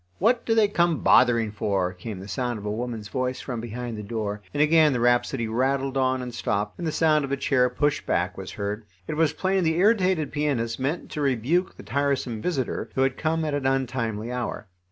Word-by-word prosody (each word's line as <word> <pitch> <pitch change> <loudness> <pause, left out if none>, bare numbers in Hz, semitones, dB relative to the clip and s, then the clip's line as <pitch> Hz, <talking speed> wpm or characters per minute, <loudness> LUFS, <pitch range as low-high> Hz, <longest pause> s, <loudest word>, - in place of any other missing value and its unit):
What 230 +6 +2
do 225 - +3
they 220 -2 +5
come 170 -5 +1
bothering 115 -4 +5
for?" 100 -3 -1
came 95 +2 -7
the 95 - -9
sound 120 +2 -2
of 105 - -8
a 105 - -1
woman's 115 -1 -4
voice 130 +3 -2
from 120 -4 -5
behind 120 +1 -5
the 105 - -5
door, 105 -1 -4
and - - -4
again 155 -1 +5
the 125 - 0
rhapsody 120 -1 +2
rattled 135 +4 0
on 130 -1 +1
and 125 -1 -6
stopped, 105 -3 -2
and 170 - -2
the - - 0
sound 155 -1 +3
of 135 - -4
a 140 - +1
chair 125 -2 +2
pushed 145 +4 0
back - - 0
was - - -7
heard. 105 +2 -3 0.2
It - - -2
was 160 -1 +3
plain 190 0 +1
the 160 -1 +2
irritated 185 -6 +3
pianist 135 -6 -1
meant 145 +6 -2
to 150 - -3
rebuke 140 +7 +1
the - - -10
tiresome 135 -5 -1
visitor, 135 -6 -2
who 130 - +1
had 135 -1 +2
come 160 +2 0
at 150 - -2
an 140 -2 0
untimely 120 -4 -1
hour. 125 -2 -4
130 Hz, 215 wpm, -25 LUFS, 115-150 Hz, 0.2 s, they